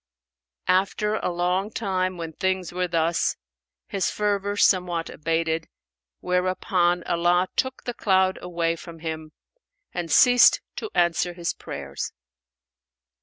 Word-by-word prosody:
After 195 +3 +2
a - - -1
long 180 +3 0
time 185 -4 -1
when 165 -1 -6
things 190 0 -1
were 180 0 0
thus, 165 0 +1 0.5
his 195 -2 -1
fervour 205 -1 -1
somewhat 180 -4 +2
abated, 165 0 -1 0.5
whereupon 180 -1 +1
Allah 175 +1 +2
took 260 0 -1
the 245 - -3
cloud 190 -3 +2
away 170 -2 -1
from 165 0 -11
him 160 -1 -5 0.6
and 175 -3 -4
ceased 245 +8 +7 0.2
to 435 - -4
answer 175 0 +2
his 170 -1 -2
prayers. - - -6
180 Hz, 120 wpm, -25 LUFS, 170-190 Hz, 0.6 s, ceased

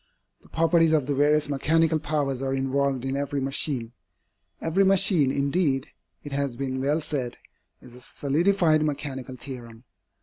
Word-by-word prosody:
The - - -21
properties 165 0 +3
of 150 -4 +2
the 145 - -1
various 150 +2 +2
mechanical 160 +3 +2
powers 145 -4 -2
are 135 0 -1
involved 135 -1 0
in 135 0 -2
every 140 0 -2
machine. 135 -3 -2 0.7
Every 170 +5 +1
machine, 190 -7 +4
indeed, 140 -1 0 0.3
it 145 - -8
has 140 -3 -2
been 130 -1 -3
well 145 +4 +1
said, 130 -6 -3 0.4
is 125 - -14
a 125 - -13
solidified 155 +4 +1
mechanical 135 -4 -4
theorem. 120 -3 -9
140 Hz, 145 wpm, -25 LUFS, 135-155 Hz, 0.7 s, machine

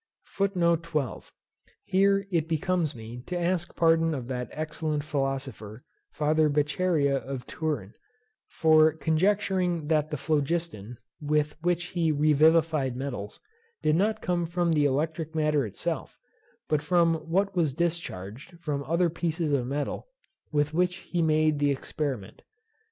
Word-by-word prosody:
Here 195 +1 +3
it 165 -3 +1
becomes 170 -2 0
me 115 +2 -8
to 180 -1 -2
ask 175 0 -1
pardon 165 -1 +3
of 125 -2 -6
that 125 -3 -3
excellent 155 -1 -3
philosopher 135 -6 -3 0.3
Father 155 +1 +2
Beccaria 150 -1 +1
of 135 -2 -6
Turin, 140 -11 -3 0.5
for 155 -1 +4
conjecturing 175 0 +1
that 155 -1 +2
the 150 - -3
phlogiston, 145 -6 -2 0.2
with 150 0 0
which 175 +1 0
he 165 -3 +1
revivified 155 -2 +3
metals, 125 -6 -5 0.4
did 155 - +3
not 215 +5 +1
come 175 -1 0
from 175 0 0
the 150 -2 +3
electric 160 +3 -1
matter 150 -5 +2
itself, 100 - -4 0.5
but 150 -1 +1
from 165 +1 +3 0.2
what 195 +3 +1
was 165 -5 +2
discharged 160 - -4
from 145 -4 -3
other 170 +5 +2
pieces 165 -2 -1
of 125 -3 +1
metal 145 - -3 0.4
with 150 0 +1
which 180 +1 +1
he 175 -2 -3
made 155 -1 +2
the 145 0 +3
experiment. 135 -5 -3
155 Hz, 130 wpm, -27 LUFS, 140-170 Hz, 0.5 s, for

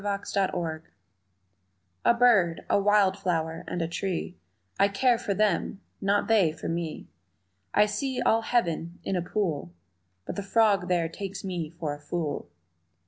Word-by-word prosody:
Indifference 195 -4 -1 1.3
A 235 - +5
BIRD, 220 -9 +4
a - - +4
wild 200 -1 +4
flower 165 -4 -1
and 175 - -2
a - - -1
tree 180 +1 -3 0.4
I 200 - +6
care 235 +4 +2
for 200 -4 -2
them, 200 -1 +1 0.2
not 200 +1 +2
they 205 -8 +4
for - - -7
me. 165 -1 -3 0.7
I 210 - +6
see 260 +5 -2
all 225 +1 +3
heaven 170 -8 -1
in 195 - -1
a 180 - +1
pool 170 - -2 0.5
But - - -5
the - - -1
frog 200 -3 +3
there 175 -3 +1
takes 195 +4 -6
me 175 -5 -3
for 160 -3 -4
a 145 - -9
fool. 150 - -3
190 Hz, 150 wpm, -27 LUFS, 170-205 Hz, 1.3 s, I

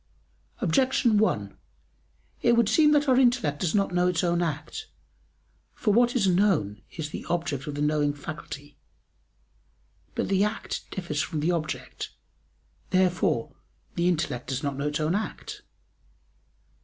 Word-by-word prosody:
Objection 235 - +3
1: 105 - 0 0.9
It 235 - +4
would 235 -2 +4
seem 300 +5 +5
that 295 0 +3
our 260 -1 +5
intellect 240 - +2
does 175 0 0
not 195 -3 +1
know 180 0 +3
its 180 -1 +1
own 175 0 +2
act. 170 - -3 0.9
For 210 -4 +1
what 240 +2 +4
is 225 -6 +3
known 175 - +2
is 150 -2 -6
the - - -5
object 165 -6 -1
of 145 - -4
the 145 - -1
knowing 150 -1 +1
faculty. 145 -1 -8 1.4
But - - -1
the 195 0 +3
act 210 +1 -3
differs 165 -6 -2
from 160 -4 -3
the 160 +4 +1
object. 160 -3 -3 0.8
Therefore 180 - +1 0.4
the 170 +1 +1
intellect 155 -8 -1
does 130 0 -2
not 140 -1 -1
know 140 +2 -2
its 150 +1 -1
own 155 +2 +1
act. 210 +3 -4
175 Hz, 145 wpm, -27 LUFS, 150-210 Hz, 1.4 s, seem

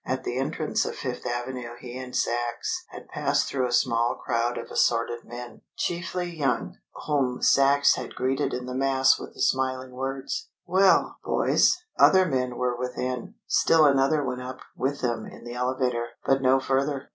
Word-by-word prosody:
At 130 0 -3
the 125 0 -2
entrance 150 +3 -1
on - - -3
Fifth 125 -1 -5
Avenue 120 0 -4
he 125 -1 -9
and 130 -1 -7
Sachs 120 - -1
had - - -11
passed - - 0
through 130 -2 0
a - - -5
small 120 -1 +2
crowd 120 0 -1
of - - -7
assorted 120 0 +1
men, 120 +1 -9 0.2
chiefly 175 0 -3
young, 135 -7 -1 0.3
whom 135 -4 0
Sachs 140 +1 +5
had - - -6
greeted 135 +3 0
in 125 0 -4
the 125 - -5
mass 135 0 +3
with - - -9
the - - -7
smiling 130 -1 0
words, 135 - -4 0.2
"Well, 190 +2 +3
boys!" - - +3 0.2
Other 190 -1 +7
men 125 -5 -1
were 125 -1 0
within. 125 0 -4
Still 160 -2 +4
another 140 +2 +3
went 125 -1 -3
up 130 +1 -7
with 140 +2 -2
them 120 -3 -2
in - - -12
the 120 0 -7
elevator, 125 -1 -1 0.2
but 135 0 +3
no 130 0 +4
further. 135 +1 -1
130 Hz, 170 wpm, -26 LUFS, 125-140 Hz, 0.3 s, Other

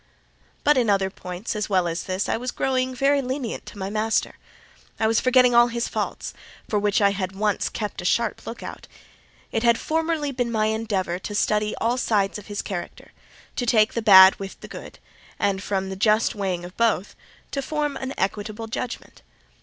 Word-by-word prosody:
But 295 -1 +4
in 235 -3 +1
other 195 -1 +2
points, 180 +4 -6
as 210 0 -2
well 185 -3 +2
as 165 +1 -3
this, 185 +1 -2
I - - +1
was 250 +3 -3
growing 260 0 -1
very 280 +2 +3
lenient 255 -2 -4
to - - -10
my 195 0 -4
master: 215 +1 0 0.6
I 220 - +2
was 225 0 +3
forgetting 255 -1 +4
all 240 0 +7
his 235 0 -2
faults, - - -4 0.3
for 210 - +1
which 205 0 +1
I 200 - +5
had 190 -1 -3
once 205 0 0
kept 210 -5 -4
a - - -8
sharp 230 +4 0
look 235 - -7
out. - - -8 0.6
It 225 - 0
had 235 -1 +4
formerly 320 -1 -1
been 245 -3 -2
my 215 -2 +1
endeavour 215 -5 -1
to 205 +2 -6
study 210 +1 +1
all 235 +2 0
sides 210 -4 +1
of 205 - -14
his 205 -1 -4
character: 180 -3 -6 0.4
to 245 - -1
take 220 -2 +4
the 230 - -1
bad 190 -3 +8
with 195 -1 -7
the - - -9
good; - - -10 0.4
and 195 -1 0
from 190 -1 -2
the - - -4
just 215 +4 +2
weighing 190 -5 -2
of 180 - -11
both, 220 -4 +1 0.4
to 275 - -2
form 295 0 -2
an 265 0 -5
equitable 210 +3 -2
judgment. 230 +2 -6
215 Hz, 195 wpm, -24 LUFS, 195-240 Hz, 0.6 s, bad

